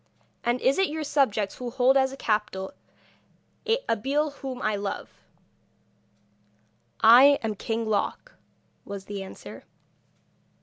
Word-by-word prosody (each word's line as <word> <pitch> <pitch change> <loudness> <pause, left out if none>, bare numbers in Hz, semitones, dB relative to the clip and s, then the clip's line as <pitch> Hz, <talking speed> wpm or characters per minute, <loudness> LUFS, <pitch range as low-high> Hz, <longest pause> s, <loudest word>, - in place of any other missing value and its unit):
And 240 +1 +1
is 270 +7 +2
it 385 - +3
your 310 +1 -4
subjects 225 -9 0
who 250 -1 -5
hold 255 +2 +3
as 265 -1 +3
a 270 - -9
captive 210 -5 -2 1.2
Abeille 280 +7 0
whom 270 -2 -7
I 215 -4 0
love?' 200 0 -5 1.9
'I 255 +6 +8
am 220 -1 -1
King 225 +2 -3
Loc,' 220 - -2 0.5
was 200 -1 -8
the 200 -1 -6
answer. 190 - -10
240 Hz, 120 wpm, -26 LUFS, 210-275 Hz, 1.9 s, I